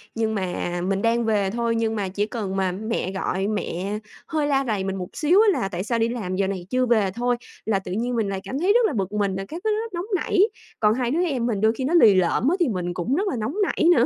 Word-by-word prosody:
nhưng 220 Hz, -1 st, 0 dB
mà 175 Hz, -2 st, -2 dB
mình 195 Hz, 0 st, 0 dB
đang 230 Hz, +1 st, +2 dB
về 205 Hz, -3 st, +1 dB
thôi 235 Hz, +1 st, 0 dB
nhưng 225 Hz, -1 st, 0 dB
mà 200 Hz, -3 st, -2 dB
chỉ 200 Hz, +2 st, -1 dB
cần 210 Hz, -4 st, -4 dB
mà 190 Hz, -1 st, +1 dB
mẹ 210 Hz, 0 st, -3 dB
gọi 190 Hz, 0 st, -1 dB
mẹ 205 Hz, -1 st, -2 dB, 0.3 s
hơi 305 Hz, -2 st, 0 dB
la 275 Hz, -1 st, +2 dB
rầy 210 Hz, -4 st, 0 dB
mình 195 Hz, 0 st, -2 dB
một 185 Hz, -2 st, -4 dB
xíu 340 Hz, +6 st, +4 dB
á 420 Hz, -4 st, +3 dB
là 195 Hz, -, 0 dB
"Tại 180 Hz, -1 st, -3 dB
sao 230 Hz, +2 st, -1 dB
đi 225 Hz, +1 st, +2 dB
làm 210 Hz, -7 st, -3 dB
giờ 195 Hz, 0 st, +1 dB
này 190 Hz, -2 st, -4 dB
chưa 255 Hz, 0 st, +2 dB
về?" 220 Hz, -5 st, +2 dB
thôi, 245 Hz, +1 st, +1 dB, 0.3 s
là 215 Hz, -3 st, +1 dB
tự 185 Hz, -1 st, -8 dB
nhiên 240 Hz, +5 st, -1 dB
mình 220 Hz, -4 st, 0 dB
lại 195 Hz, -1 st, -2 dB
cảm 270 Hz, -, -4 dB
thấy 375 Hz, +5 st, +3 dB
rất 480 Hz, 0 st, +4 dB
là 375 Hz, -, 0 dB
bực 195 Hz, -4 st, -2 dB
mình 200 Hz, -2 st, 0 dB
rồi 195 Hz, 0 st, -4 dB
các 330 Hz, +3 st, -7 dB
thứ 440 Hz, -, +1 dB
rất 455 Hz, -1 st, -5 dB
nóng 345 Hz, +1 st, -3 dB
nảy, 375 Hz, -, 0 dB, 0.4 s
còn 210 Hz, -1 st, +4 dB
hai 245 Hz, 0 st, -1 dB
đứa 335 Hz, +5 st, +1 dB
em 265 Hz, -8 st, -1 dB
mình 220 Hz, -5 st, -1 dB
đôi 220 Hz, +1 st, +4 dB
khi 245 Hz, -, -4 dB
nó 280 Hz, +6 st, 0 dB
lì 220 Hz, -, +7 dB
lợm 185 Hz, +8 st, +2 dB
á 350 Hz, -, +2 dB
thì 345 Hz, -, +3 dB
mình 180 Hz, -3 st, -2 dB
cũng 180 Hz, +9 st, -1 dB
rất 395 Hz, +6 st, 0 dB
là 385 Hz, -, -1 dB
nóng 225 Hz, +9 st, -3 dB
nảy 335 Hz, -, +1 dB
nữa. 240 Hz, -, +4 dB
220 Hz, 285 wpm, -24 LUFS, 195-260 Hz, 0.4 s, lì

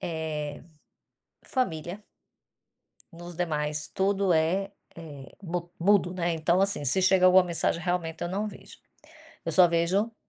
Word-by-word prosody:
eh, 155 Hz, -3 st, -4 dB, 0.8 s
família. 185 Hz, -, -3 dB, 1.1 s
Nos 175 Hz, 0 st, -9 dB
demais, 150 Hz, -3 st, -2 dB
tudo 195 Hz, -1 st, +1 dB
é 180 Hz, +5 st, +1 dB, 0.2 s
é 150 Hz, -5 st, -10 dB, 0.2 s
mu 175 Hz, -1 st, -4 dB
mudo, 185 Hz, -1 st, +3 dB
né, 175 Hz, -2 st, -1 dB
então 170 Hz, +3 st, +1 dB
assim, 195 Hz, -7 st, +1 dB
se 150 Hz, +9 st, +2 dB
chega 185 Hz, 0 st, +4 dB
alguma 185 Hz, 0 st, +7 dB
mensagem, 170 Hz, -1 st, 0 dB
realmente, 175 Hz, -2 st, -2 dB
eu 175 Hz, -, -2 dB
não 200 Hz, +4 st, -2 dB
vejo. 210 Hz, -, -11 dB, 0.7 s
Eu -, -, -1 dB
só 180 Hz, -1 st, +7 dB
vejo 185 Hz, +7 st, 0 dB
175 Hz, 135 wpm, -27 LUFS, 160-190 Hz, 1.1 s, alguma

